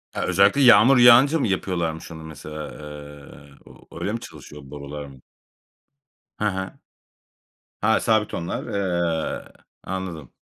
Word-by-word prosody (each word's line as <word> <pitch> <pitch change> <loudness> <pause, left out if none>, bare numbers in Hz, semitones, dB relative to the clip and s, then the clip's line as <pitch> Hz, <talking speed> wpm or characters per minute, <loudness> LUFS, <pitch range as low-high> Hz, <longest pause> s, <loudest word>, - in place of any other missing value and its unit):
E, - - -3
özellikle 100 +9 +3
yağmur 125 +1 +7
yağınca 125 +6 +6
mı 130 - 0
yapıyorlarmış 85 -5 -3
onu 80 -1 -9
mesela? 75 -1 -8
Eee, 75 -1 -12
o - - -18
oraya 105 - -3
mı 115 - -3
çalışıyor 75 -8 -12
borular 75 +1 -8
mı? 65 -2 -15 1.2
Ha 105 - -2
ha. 95 0 -6 1.0
Ha, 110 +1 +3
sabit 110 -2 +1
onlar. 85 0 -4
Eee, 85 -5 -2 0.3
anladım. 90 -7 -6
85 Hz, 125 wpm, -23 LUFS, 75-105 Hz, 1.2 s, yağmur